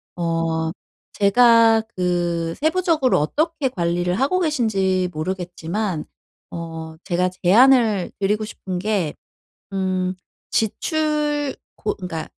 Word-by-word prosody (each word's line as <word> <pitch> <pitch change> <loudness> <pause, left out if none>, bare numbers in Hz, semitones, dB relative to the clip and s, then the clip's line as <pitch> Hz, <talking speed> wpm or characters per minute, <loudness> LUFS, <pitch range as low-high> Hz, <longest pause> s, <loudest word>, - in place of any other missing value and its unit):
어 165 -1 -1 0.4
제가 225 +1 +5
그 175 -2 -1
세부적으로 320 -4 +2
어떻게 300 - 0
관리를 175 -3 -1
하고 285 +8 +2
계신지 195 - +1
모르겠지만 180 +2 -3 0.4
어 165 -1 -7
제가 180 0 +1
제안을 220 -1 +5
드리고 210 +2 0
싶은 185 -4 -5
게 190 -6 -1 0.6
음 185 -1 -1 0.4
지출 295 - 0 0.2
고 210 - -2
그러니까 175 -4 -5
190 Hz, 220 characters per minute, -21 LUFS, 175-250 Hz, 0.6 s, 제가